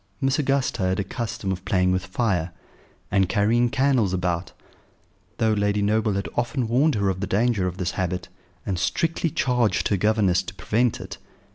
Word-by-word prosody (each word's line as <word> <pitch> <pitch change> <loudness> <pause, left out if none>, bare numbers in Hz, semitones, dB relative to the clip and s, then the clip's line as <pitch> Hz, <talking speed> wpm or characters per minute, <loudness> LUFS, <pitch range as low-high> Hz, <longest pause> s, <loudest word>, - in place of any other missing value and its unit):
Miss 135 +2 +1
Augusta 135 -5 0
had 95 +1 +1
a - - +1
custom 100 -1 -4
of 95 0 -4
playing 90 -1 +2
with 95 +1 -1
fire, 95 -4 0 0.6
and 95 -3 +2
carrying 115 +4 +2
candles 130 -7 +2
about, 90 -1 -1 0.9
though 110 -1 +2
Lady 105 0 +1
Noble 105 +1 +1
had 100 0 -2
often 120 +1 -1
warned 135 +6 +3
her 100 -2 +1
of 95 -1 -2
the 100 - -2
danger 105 -1 +1
of 90 0 -5
this 90 -2 -1
habit, 90 0 -3 0.4
and 95 -3 -2
strictly 165 - 0
charged 125 -6 +1
her 100 - +2
governess 100 -2 +2
to 95 - -9
prevent 110 +5 0
it. - - -8
105 Hz, 175 wpm, -24 LUFS, 95-120 Hz, 0.9 s, warned